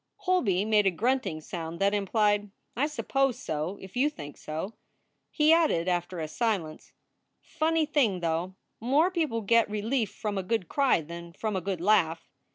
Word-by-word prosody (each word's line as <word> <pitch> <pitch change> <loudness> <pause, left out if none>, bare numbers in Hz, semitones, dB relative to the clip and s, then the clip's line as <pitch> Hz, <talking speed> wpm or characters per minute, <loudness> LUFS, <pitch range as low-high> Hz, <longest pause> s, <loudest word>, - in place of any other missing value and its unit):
Holby 360 - +1
made 210 -2 +3
a - - +6
grunting 205 -4 -1
sound 165 0 -6
that 200 +1 +2
implied, 205 0 +1 0.3
"I 280 +5 +1
suppose 270 -4 0
so, 165 - -3
if 190 +3 -12
you 270 +4 +3
think 145 - -9
so." 160 +8 -5 0.6
He 305 +1 +4
added, 310 - +2
after 175 0 -1
a 155 - -3
silence: 185 -5 -2 0.5
Funny 320 0 0
thing, 270 - +1
though; 170 +2 -2 0.2
more 285 +10 +3
people 310 -11 -1
get 230 +2 +3
relief 215 +2 -1
from 205 -1 -3
a - - 0
good 185 -1 -1
cry 275 - +2
than 170 +2 -9
from 215 +3 -3
a 190 - -1
good 185 -1 -3
laugh. 175 -5 +2
205 Hz, 165 wpm, -28 LUFS, 175-260 Hz, 0.6 s, a